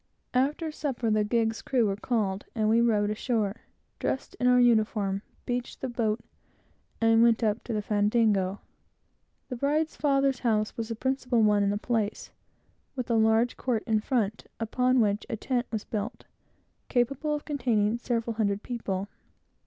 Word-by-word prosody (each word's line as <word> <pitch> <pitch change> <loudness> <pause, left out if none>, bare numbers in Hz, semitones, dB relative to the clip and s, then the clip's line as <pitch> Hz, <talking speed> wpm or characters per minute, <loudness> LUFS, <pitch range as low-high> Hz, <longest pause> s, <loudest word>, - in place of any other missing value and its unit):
After 290 +5 +1
supper, 260 -7 -2
the 215 0 +3
gig's 225 +1 0
crew 250 -4 +1
were 200 -2 0
called, 205 -3 -1
and 215 -2 +1
we 225 +2 +4
rowed 210 -3 +2
ashore, 215 -2 -1 0.4
dressed 265 - -2
in 250 - +2
our 250 0 +5
uniform, 215 -4 +2 0.2
beached 245 0 -3
the 265 - -3
boat, 225 -2 -1 0.8
and 225 0 +4
went 235 0 +4
up 215 +1 0
to 235 - -3
the 210 -1 -1
fandango. 205 -2 +1 0.9
The 250 - -4
bride's 300 +5 0
father's 275 -2 +2
house 215 -3 0
was 225 -1 -3
the 230 - -4
principal 255 -1 0
one 210 -1 +4
in 200 - +2
the 205 - 0
place, 220 -2 -2 0.6
with 250 -2 -3
a - - +3
large 220 +2 +3
court 235 -4 -1
in 220 -2 +2
front, 220 -2 -1
upon 250 +3 +2
which 205 -1 +1
a - - -1
tent 245 +2 -1
was 220 -2 -2
built, 215 +1 -5 0.6
capable 275 +5 0
of 295 - -6
containing 235 -6 +1
several 235 -1 -1
hundred 205 -2 0
people. 200 -5 -3
230 Hz, 160 wpm, -28 LUFS, 210-250 Hz, 0.9 s, our